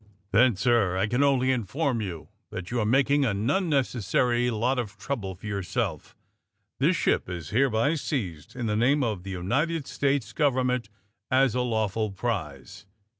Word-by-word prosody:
'' 100 +1 -39
V^Then, 115 -1 +5
sir, 105 -5 +2
I 95 - +2
can 120 +5 0
only 130 -2 +3
inform 130 - -1
you 90 -6 -6 0.2
that 90 +3 -7
you 120 - 0
are 105 - +1
making 140 +4 +3
an 105 -3 0
unnecessary 125 - +1
lot 120 +3 0
of 110 -5 -5
trouble 100 -9 -4
for 90 - -14
yourself. 100 -4 -3 0.6
This - - +3
ship - - +1
is 85 -3 -6
hereby 125 +3 +2
seized, 105 - -4
in 125 -2 -3
the 105 -1 0
name 135 +6 +3
of 105 -6 -2
the 95 - -9
United 135 - -1
States 135 -7 -1
government, 125 -5 +1 0.4
as 130 -2 +3
a 125 - 0
law 110 -3 +1
ful 110 +2 -2
prize!" 95 - -4
120 Hz, 170 wpm, -26 LUFS, 100-130 Hz, 0.6 s, V^Then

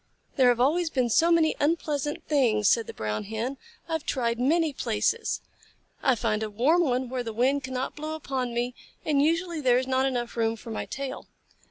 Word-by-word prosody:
"There 260 -3 +5
have 240 -1 +2
always 320 +7 +2
been 255 -5 0
so 330 +8 +4
many 325 -2 +4
unpleasant 295 -1 -1
things," 230 -8 +2
said 230 +1 +3
the - - -7
Brown 105 - -3
Hen. 225 +6 -3 0.3
"I - - -9
have 320 -2 -1
tried 235 -3 -1
many 310 +4 +2
places. 245 - -1 0.6
I 260 - +3
find 215 -2 -1
a 220 - -2
warm 265 +12 +3
one 255 -5 0
where 255 0 -3
the 230 -2 -4
wind 265 +5 +1
cannot 260 0 -3
blow 310 +1 -4
upon 265 -5 -3
me, 240 +1 -1 0.3
and 290 -3 +2
usually 335 +1 0
there 250 -3 +4
is 260 - 0
not 260 +1 +1
enough 245 -3 -3
room 225 -1 +1
for 230 +1 -10
my 220 - -4
tail. 275 -1 -5
260 Hz, 200 wpm, -27 LUFS, 235-300 Hz, 0.6 s, There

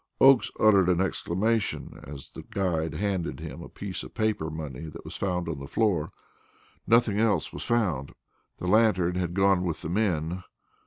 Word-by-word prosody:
Oakes 135 -2 +6
uttered 100 -4 +5
an 90 -1 +3
exclamation, 100 +3 -1
as 70 -1 -9
the - - -8
guide 85 -4 -1
handed 95 -4 -2
him 75 +6 -7
a - - -9
piece 100 -2 -5
of - - -10
paper 110 -8 0
money 80 -1 -6
that 75 - -10
was - - -8
on 90 -2 0
the 80 -5 -5
floor. 100 -4 +1 0.8
Nothing 115 -3 +4
else 105 -7 +1
was - - -5
found. 90 - 0 0.5
The - - -6
lantern 95 -3 +3
had 90 -1 -2
gone 95 -2 +3
with 85 -3 -3
the 80 - -3
men. 90 -3 0
90 Hz, 165 wpm, -27 LUFS, 80-105 Hz, 0.8 s, Oakes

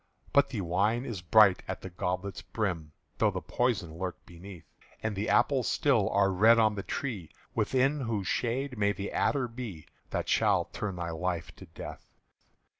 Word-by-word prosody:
But 140 -1 +5
the 115 -6 -3
wine 105 +8 +1
is 105 -7 -5
bright 95 +2 +5
at 95 - -4
the 95 - -8
goblet's 90 +2 -3
brim 90 -9 -3 0.3
Though - - +4
the - - -3
poison 100 -10 -1
lurk 90 -1 -5
beneath; 90 0 -11 0.4
And 110 -2 -1
the 100 +3 -2
apples 135 -4 +3
still 125 -9 +2
are 100 0 +3
red 110 +5 +6
on 110 -1 +4
the 100 - -4
tree 105 - -4 0.2
Within 135 +3 +2
whose 115 -6 -2
shade 125 +1 -1
may 100 0 +3
the 100 +1 -5
adder 135 -3 +1
be 115 -9 -7 0.2
That - - -2
shall - - +3
turn 105 -3 -3
thy 85 -1 -4
life 85 0 -3
to 95 - -12
death. 80 - -9
100 Hz, 175 wpm, -30 LUFS, 90-115 Hz, 0.4 s, red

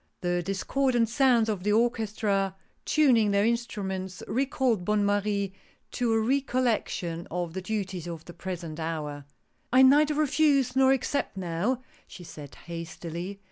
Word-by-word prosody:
The 175 0 0
discordant 230 +6 0
sounds 240 -3 +3
of 210 -4 -2
the 205 +2 +1
orchestra 215 -4 +1 0.3
tuning 250 -9 +4
their 200 +1 +3
instruments 195 -5 -3
recalled 255 -4 0
Bonne 210 +2 +1
Marie 200 -1 0 0.4
to 245 -2 0
a 225 - +3
recollection 235 -9 0
of 175 -1 -3
the 190 - -4
duties 190 -3 -4
of 165 -2 -7
the 175 - -10
present 170 -4 -6
hour. 150 -3 -4 0.2
" - - -44
I 260 +2 +6
neither 295 +3 +5
refuse 290 -4 +2
nor 265 0 +5
accept 270 -3 -1
now," 190 +8 -1 0.2
she 180 - -11
said, 150 -4 -10
hastily. 170 +2 -6
205 Hz, 140 wpm, -27 LUFS, 175-250 Hz, 0.4 s, I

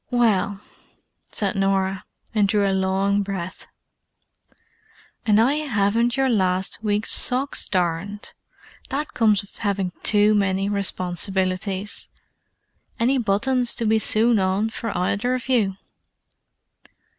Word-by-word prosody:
"Well——" 205 -5 +1 0.7
said 200 -3 -1
Norah; 195 0 0 0.3
and 210 -2 +3
drew 200 0 +2
a 195 - +1
long 190 +1 +1
breath. 190 -3 -6 1.6
"And 210 0 +5
I 245 +5 +4
haven't 235 -4 0
your 270 0 +2
last 190 -4 0
week's 210 0 0
socks 265 +3 0
darned! 185 +2 -2 0.6
That 290 +3 -3
comes 215 -4 +2
of 200 - -19
having 200 -4 -1
too 210 0 +5
many 195 -1 +1
responsibilities. 190 0 -1 0.9
Any 255 +4 +2
buttons 240 +3 +1
to 235 - -2
be 220 0 +3
sewn 220 +1 +3
on 195 +4 0
for 230 +1 -4
either 205 +7 0
of 255 - -6
you?" 220 -7 +2
205 Hz, 115 wpm, -23 LUFS, 195-230 Hz, 1.6 s, And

